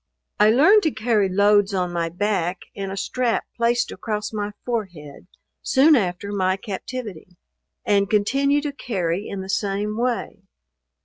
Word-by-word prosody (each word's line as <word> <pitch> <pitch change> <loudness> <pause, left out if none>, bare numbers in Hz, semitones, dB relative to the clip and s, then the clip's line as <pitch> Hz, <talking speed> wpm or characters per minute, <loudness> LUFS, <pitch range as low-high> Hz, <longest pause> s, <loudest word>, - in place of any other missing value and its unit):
I 210 +1 +6
learned 315 - +6
to 320 - +1
carry 215 -5 +1
loads 200 +1 +3
on 180 -1 -1
my 170 -1 -1
back, 180 -1 -1 0.2
in 195 -1 -5
a 195 - -6
strap 245 +2 -1
placed 235 +1 +1
across 210 -1 -4
my 210 -1 -3
forehead, 180 - -5 0.3
soon 295 +4 +5
after 195 -3 -1
my 190 -1 0
captivity; 195 -3 -7 0.5
and 200 -1 +2
continue 275 +7 +2
to 290 -1 -3
carry 195 -8 -3
in 195 - -5
the 190 - -7
same 205 +1 -1
way. 240 -2 -2
205 Hz, 145 wpm, -22 LUFS, 190-235 Hz, 0.5 s, I